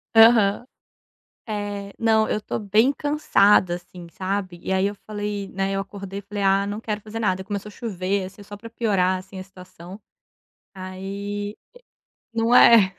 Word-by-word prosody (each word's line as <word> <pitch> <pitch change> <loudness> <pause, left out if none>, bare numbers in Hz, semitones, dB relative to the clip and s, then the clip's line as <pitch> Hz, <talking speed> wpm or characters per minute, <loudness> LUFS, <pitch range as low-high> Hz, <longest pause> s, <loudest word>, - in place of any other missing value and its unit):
Aham, 225 0 +6 0.8
é, 205 -2 -4
não, 220 -1 +3
eu - - -1
estou 215 - -4
bem 215 +5 +3
cansada 210 - +3
assim, 175 0 -10
sabe. 190 -1 -3
E - - -2
aí, 190 +1 +2
eu 205 - -2
falei, 205 -1 -4
né, 195 +1 -2
eu 195 - -1
acordei 195 0 -7
e - - -19
falei: 205 0 -5
"Ah, 195 +1 +3
não 205 +1 -4
quero 215 -2 -4
fazer 220 +2 -7
nada." 190 -4 0
E - - -16
começou 200 +1 -5
a - - -12
chover 195 -4 -2
assim 195 +2 -10
só 205 0 -10
para 230 +2 -11
piorar 190 -5 +1
assim 190 +1 -11
a 185 - -5
situação, 185 0 -13 0.7
aí 200 +2 -5 0.8
Não 230 +1 +2
é. 215 -6 +7
200 Hz, 170 wpm, -23 LUFS, 190-215 Hz, 0.8 s, é